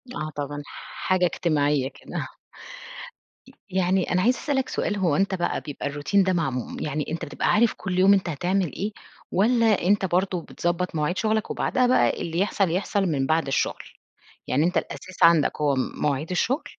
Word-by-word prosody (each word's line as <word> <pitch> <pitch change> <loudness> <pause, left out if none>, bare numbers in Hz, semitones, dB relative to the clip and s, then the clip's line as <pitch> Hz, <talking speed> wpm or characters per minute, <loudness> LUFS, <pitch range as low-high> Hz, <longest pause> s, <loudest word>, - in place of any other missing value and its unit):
آه 155 - -3
طبعًا، 145 0 -4
حاجة 185 +4 -2
اجتماعيّة 145 -6 +1
كده. - - -6 1.2
ي - - -15 0.2
يعني 185 0 +1
أنا 185 0 +2
عايزة 250 +5 +2
اسألك 270 -3 -1
سؤال 205 - -1
هو 175 -7 +1
أنت 195 +3 +1
بقى 175 - -1
بيبقى 145 -1 -5
الRoutine 170 +7 +2
ده 185 - +2
معموم 135 -8 -2
يعني 150 0 -2
أنت 165 - -3
بتبقى - - -3
عارف 230 +2 +4
كُلّ 185 -2 -3
يوم 195 +2 +6
أنت 190 -3 +1
هتعمل 175 +3 -1
إيه؟ 205 +2 -3 0.4
والّا 230 +5 +3 0.2
أنت 195 +2 +2
برضه 185 0 0
بتضبط 175 +2 -2
مواعيد 155 +4 -1
شُغلك، 220 0 0
وبعدها 255 0 +1
بقى 255 - +2
اللي 165 0 -2
يحصل 195 -2 +1
يحصل 195 +2 0
من 145 -6 0
بعد 160 0 +1
الشُّغل؟ 135 - -1 0.6
يعني 145 +4 +1
أنت 180 - 0
الأساس 185 -1 -6
عندك 165 -3 +4
هو 145 -2 +2
مواعيد 140 +3 -2
الشُّغل، 245 - 0
180 Hz, 170 wpm, -24 LUFS, 150-195 Hz, 1.2 s, يوم